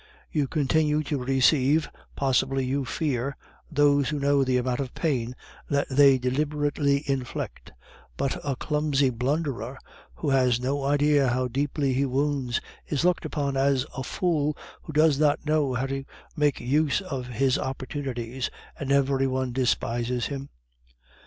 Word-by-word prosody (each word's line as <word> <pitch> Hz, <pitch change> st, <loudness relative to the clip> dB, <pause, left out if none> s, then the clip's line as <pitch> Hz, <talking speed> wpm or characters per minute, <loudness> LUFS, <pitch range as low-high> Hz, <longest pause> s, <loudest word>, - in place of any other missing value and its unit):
"You 145 Hz, -3 st, +1 dB
continue 150 Hz, +1 st, +1 dB
to 145 Hz, -3 st, -2 dB
receive, 135 Hz, +3 st, +3 dB, 0.3 s
possibly 135 Hz, 0 st, +1 dB
you 135 Hz, +1 st, -1 dB
fear, 140 Hz, -2 st, -2 dB, 0.3 s
those 145 Hz, -1 st, +3 dB
who 150 Hz, -, -2 dB
know 140 Hz, 0 st, +3 dB
the 130 Hz, -1 st, +1 dB
amount 125 Hz, 0 st, -1 dB
of 135 Hz, -3 st, -4 dB
pain 125 Hz, -7 st, -1 dB, 0.3 s
that 140 Hz, 0 st, +1 dB
they 135 Hz, 0 st, +6 dB
deliberately 145 Hz, +2 st, 0 dB
inflict; 135 Hz, -3 st, -4 dB, 0.5 s
but 135 Hz, -1 st, 0 dB
a 140 Hz, -2 st, -1 dB
clumsy 145 Hz, -1 st, +1 dB
blunderer 130 Hz, 0 st, -2 dB, 0.4 s
who 145 Hz, -, -2 dB
has 130 Hz, -3 st, +3 dB
no 135 Hz, +2 st, -1 dB
idea 145 Hz, 0 st, +3 dB
how 125 Hz, +1 st, +1 dB
deeply 140 Hz, +2 st, -1 dB
he 135 Hz, +2 st, +1 dB
wounds 135 Hz, -2 st, 0 dB, 0.3 s
is 150 Hz, +2 st, 0 dB
looked 180 Hz, -1 st, +2 dB
upon 140 Hz, -2 st, -2 dB
as 135 Hz, -1 st, +2 dB
a 130 Hz, -, -3 dB
fool 150 Hz, -1 st, 0 dB, 0.2 s
who -, -, -8 dB
does 155 Hz, -1 st, +4 dB
not 150 Hz, -1 st, +2 dB
know 150 Hz, -4 st, +1 dB
how 130 Hz, +2 st, 0 dB
to 135 Hz, 0 st, -3 dB, 0.3 s
make 150 Hz, -2 st, +1 dB
use 145 Hz, +6 st, +1 dB
of 135 Hz, -10 st, -5 dB
his 130 Hz, +2 st, +1 dB
opportunities, 130 Hz, -2 st, -4 dB, 0.3 s
and 140 Hz, -1 st, -3 dB
every 135 Hz, -1 st, +3 dB
one 130 Hz, -1 st, -1 dB
despises 120 Hz, -1 st, 0 dB
him." 140 Hz, -1 st, -5 dB
140 Hz, 145 wpm, -26 LUFS, 130-145 Hz, 0.5 s, they